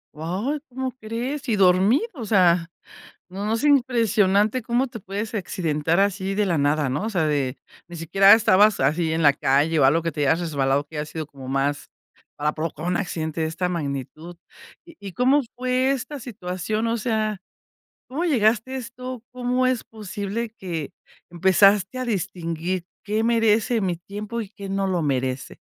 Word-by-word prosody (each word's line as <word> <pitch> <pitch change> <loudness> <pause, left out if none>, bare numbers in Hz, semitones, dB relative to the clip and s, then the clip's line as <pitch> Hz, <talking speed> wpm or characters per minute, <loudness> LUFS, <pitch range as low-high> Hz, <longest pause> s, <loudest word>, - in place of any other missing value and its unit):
Guau, 195 - -2
¿cómo 260 0 -4
crees?, 250 +6 -4
y 225 - +2
dormido, 195 - +4
o 235 - -6
sea, 180 -5 +3 0.6
no 195 +3 -5
no 215 - 0
es 230 - -1
impresionante 230 -5 +3
cómo 240 +4 0
te 235 - -9
puedes 205 +3 -5
accidentar 170 -4 0
así 195 -1 0
de 210 0 +2
la 175 -4 +1
nada, 145 0 +1
¿no?, 145 +10 -2
o 225 - -1
sea, 180 -7 0
de 140 -3 -1 0.3
ni 175 - -10
siquiera 195 +4 +5
estabas 210 -4 +4
así 160 +4 +1
en 165 - 0
la 145 - +7
calle 145 +4 +1
o 135 - +5
algo, 155 +5 +4
que 165 0 -2
te 145 -1 -1
hayas 160 +4 +2
resbalado, 140 -4 0
que 150 +1 -9
haya 150 - -2
sido 155 +1 -6
como 135 -3 -11
más 140 +2 -1 0.5
para 150 +1 0
provocar 160 +1 -4
un 180 - +1
accidente 160 -5 -3
de 160 - +1
esta 170 +3 -2
magnitud, 155 +1 -5 0.5
¿y 335 -1 -16
y 195 -2 -8
cómo 260 +6 +3
fue 255 +1 +1
esta 275 +2 -4
situación?, 215 -1 -3
o 230 - 0
sea, 215 -2 -1 0.7
¿cómo 295 +7 -2
llegaste 235 -4 +2
a - - -2
esto? 250 0 -7
¿Cómo 250 0 0
es 255 -2 0
posible 210 +1 -5
que 165 -6 -5 0.4
empezaste 190 +6 +3
a 255 - -2
distinguir, 180 -4 -3 0.2
qué 215 +1 0
merece 225 0 +2
mi 185 -4 -1
tiempo 205 +6 -6
y 210 - -7
qué 200 -2 -9
no 195 0 0
lo 180 -3 0
merece? 130 -2 -2
195 Hz, 175 wpm, -23 LUFS, 165-230 Hz, 0.7 s, la